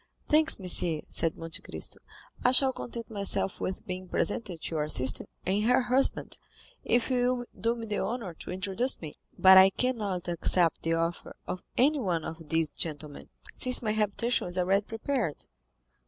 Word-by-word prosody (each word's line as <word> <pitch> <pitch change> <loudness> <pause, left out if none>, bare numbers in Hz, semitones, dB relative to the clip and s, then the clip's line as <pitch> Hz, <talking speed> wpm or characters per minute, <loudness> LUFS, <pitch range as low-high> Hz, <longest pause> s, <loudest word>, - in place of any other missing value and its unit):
"Thanks, 310 -2 +4
monsieur," 175 -4 -2
said 165 -1 -1
Monte 165 0 -6
Cristo; - - -5 0.4
"I 250 - +4
shall 265 0 +6
content 235 -2 -7
myself 200 -2 -1
with 190 - -4
being 185 0 -6
presented 200 -4 -1
to - - -2
your 150 -1 0
sister 130 -3 0 0.2
and 195 +3 +1
her 250 +2 +4
husband, 250 +2 +1 0.4
if 240 +2 +1
you 250 0 +2
will 245 -1 -5 0.2
do 230 +1 +1
me 230 -1 -6
the 210 -1 -2
honor 225 -7 -3
to - - -10
introduce 195 +7 0
me; 155 -3 -9 0.2
but 190 0 +9
I 190 0 +8
cannot 205 -6 -2
accept 170 0 +2
the 165 0 0
offer 165 +1 -3
of 180 0 -5 0.2
anyone 240 - +2
of 160 -1 -8
these 160 -1 +1
gentlemen, 150 -2 -5 0.2
since 255 -1 +3
my 215 - 0
habitation 215 +2 0
is 175 +1 -5
already 195 +3 +1
prepared." 225 - -3
195 Hz, 170 wpm, -29 LUFS, 170-240 Hz, 0.4 s, but